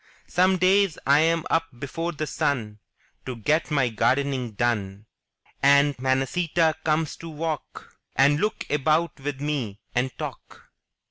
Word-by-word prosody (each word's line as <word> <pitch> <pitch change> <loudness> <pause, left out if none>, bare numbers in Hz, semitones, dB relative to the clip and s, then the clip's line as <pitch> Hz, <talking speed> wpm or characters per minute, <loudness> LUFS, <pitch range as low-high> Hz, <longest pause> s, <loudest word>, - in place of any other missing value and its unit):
Some 185 +1 +2
days 185 -1 +3
Tm 160 +4 +3
up 165 0 +2
before 165 +7 -4
the 155 -1 -4
sun 115 -8 -2 0.5
To 130 - -4
get 150 +9 0
my 140 -5 +2
gardening 125 +1 0
done; 105 -3 -1 0.6
And 140 +1 +5
Manacita 155 +5 +1
comes 155 0 0
to 165 - -9
walk 155 -1 -6 0.2
And 140 +2 +4
look 215 +4 -1
about 155 +3 +1
with 140 0 -4
me, 135 -9 -3
and 125 +2 +1
talk. - - -9
145 Hz, 130 wpm, -25 LUFS, 130-165 Hz, 0.6 s, And